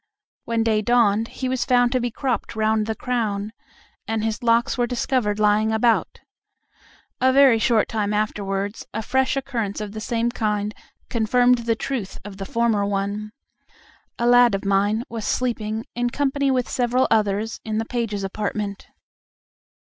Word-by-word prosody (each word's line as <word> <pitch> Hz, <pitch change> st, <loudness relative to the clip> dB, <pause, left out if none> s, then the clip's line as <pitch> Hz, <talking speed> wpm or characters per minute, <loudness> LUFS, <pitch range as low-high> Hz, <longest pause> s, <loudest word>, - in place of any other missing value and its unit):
When 230 Hz, -1 st, 0 dB
day 220 Hz, -2 st, +2 dB
dawned 225 Hz, -1 st, +3 dB
he 260 Hz, -, -5 dB
was 255 Hz, -1 st, 0 dB
found 245 Hz, -1 st, +3 dB
to 255 Hz, -, +1 dB
be 245 Hz, 0 st, -1 dB
cropped 240 Hz, -2 st, -3 dB
round 220 Hz, 0 st, +1 dB
the 220 Hz, -, -2 dB
crown, 215 Hz, -4 st, -2 dB, 0.5 s
and 225 Hz, -1 st, -1 dB
his 220 Hz, -1 st, -2 dB
locks 235 Hz, 0 st, +2 dB
were 245 Hz, -2 st, 0 dB
discovered 240 Hz, -3 st, 0 dB
lying 215 Hz, +1 st, +3 dB
about. 225 Hz, +1 st, +1 dB, 1.0 s
A 260 Hz, 0 st, +4 dB
very 265 Hz, -4 st, +6 dB
short 220 Hz, -1 st, +2 dB
time 210 Hz, -2 st, -1 dB
afterwards 205 Hz, -1 st, -2 dB
a 220 Hz, -, -2 dB
fresh 265 Hz, +3 st, +1 dB
occurrence 235 Hz, -7 st, -3 dB
of 210 Hz, -1 st, -5 dB
the 215 Hz, +1 st, -7 dB
same 235 Hz, +1 st, -1 dB
kind 210 Hz, -3 st, -1 dB, 0.4 s
confirmed 245 Hz, +2 st, +3 dB
the 230 Hz, -1 st, 0 dB
truth 225 Hz, -5 st, -4 dB
of 200 Hz, -2 st, -9 dB
the 195 Hz, -1 st, -6 dB
former 230 Hz, -5 st, +1 dB
one. 200 Hz, +1 st, -2 dB, 0.9 s
A 235 Hz, -, -1 dB
lad 245 Hz, -2 st, +6 dB
of 195 Hz, -, -5 dB
mine 200 Hz, +3 st, +2 dB
was 225 Hz, -1 st, -6 dB
sleeping, 220 Hz, -2 st, -2 dB
in 240 Hz, 0 st, -1 dB
company 280 Hz, +1 st, 0 dB
with 255 Hz, -2 st, +1 dB
several 250 Hz, +1 st, +1 dB
others, 215 Hz, 0 st, +1 dB
in 215 Hz, -1 st, -3 dB
the 225 Hz, -, -1 dB
pages' 225 Hz, -5 st, -3 dB
apartment. 205 Hz, 0 st, -4 dB
225 Hz, 160 wpm, -23 LUFS, 210-245 Hz, 1.0 s, very